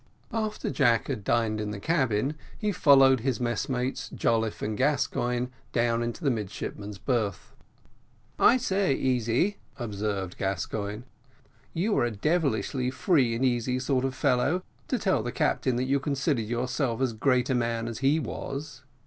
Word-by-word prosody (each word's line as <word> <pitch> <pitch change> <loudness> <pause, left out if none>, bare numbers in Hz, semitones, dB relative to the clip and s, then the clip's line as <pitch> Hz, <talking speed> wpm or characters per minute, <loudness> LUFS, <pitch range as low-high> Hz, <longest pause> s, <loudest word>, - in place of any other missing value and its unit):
After 215 -1 -2
Jack 120 -4 +2
had 120 -7 -3
dined 110 -1 +1
in 105 - -3
the 105 -1 -5
cabin 130 -2 +1 0.2
he 210 -2 0
followed 135 -6 +6
his 130 +1 -1
messmates 125 +2 -2
Jolliffe 115 -2 0
and 105 0 -1
Gascoigne 125 -2 0 0.2
down 115 0 +2
into 120 +8 -4
the 140 - +3
midshipmen's 105 -1 -5
berth. 105 - -2 0.9
"I 255 - +6
say, 195 - +1
Easy," 130 - +1 0.2
observed 100 -5 -3
Gascoigne, 100 +3 -3 0.7
"you 200 +6 +1
are - - +3
a - - 0
devilish 140 - 0 0.2
free 130 -4 +2
and 125 +3 +1
easy 125 0 +1
sort 130 0 0
of 135 -1 -1
a - - -14
fellow, 140 +9 +1 0.2
to - - 0
tell - - +1
the - - -3
captain 130 - +1
that 125 - 0
you 135 +2 +1
considered 135 -4 -1
yourself 120 +1 -1
as 130 -3 +1
great 125 +2 +2
a - - +3
man 115 -1 0
as 115 -2 -5
he 140 +4 +3
was." 140 0 -5
125 Hz, 155 wpm, -27 LUFS, 115-140 Hz, 0.9 s, followed